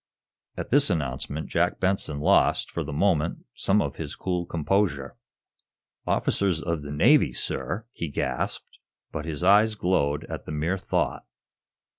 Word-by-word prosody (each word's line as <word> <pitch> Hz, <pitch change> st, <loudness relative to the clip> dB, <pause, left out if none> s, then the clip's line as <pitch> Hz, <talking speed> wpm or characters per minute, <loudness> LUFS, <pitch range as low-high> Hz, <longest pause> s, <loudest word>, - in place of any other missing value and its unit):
At -, -, -5 dB
this 140 Hz, 0 st, +4 dB
announcement 75 Hz, -2 st, -2 dB
Jack -, -, +1 dB
Benson 95 Hz, -6 st, 0 dB
lost, -, -, +3 dB
for 85 Hz, -, -2 dB
the 75 Hz, -, -6 dB
moment, 80 Hz, 0 st, +1 dB
some 100 Hz, +2 st, +2 dB
of 70 Hz, 0 st, -5 dB
his 75 Hz, -3 st, -5 dB
cool 90 Hz, -2 st, -2 dB
composure. 85 Hz, -4 st, 0 dB, 0.9 s
"Officers 95 Hz, -5 st, +1 dB
of 85 Hz, -2 st, -2 dB
the 70 Hz, -, -8 dB
Navy, 75 Hz, -3 st, +4 dB
sir!" 75 Hz, -, -3 dB
he 85 Hz, -, -4 dB
gasped, 65 Hz, -2 st, -3 dB, 0.3 s
but 80 Hz, -1 st, -4 dB
his 80 Hz, 0 st, -3 dB
eyes 105 Hz, +3 st, +5 dB
glowed 75 Hz, -7 st, +1 dB
at -, -, -7 dB
the -, -, -5 dB
mere 80 Hz, +5 st, -1 dB
thought. -, -, -1 dB
80 Hz, 145 wpm, -26 LUFS, 75-95 Hz, 0.9 s, eyes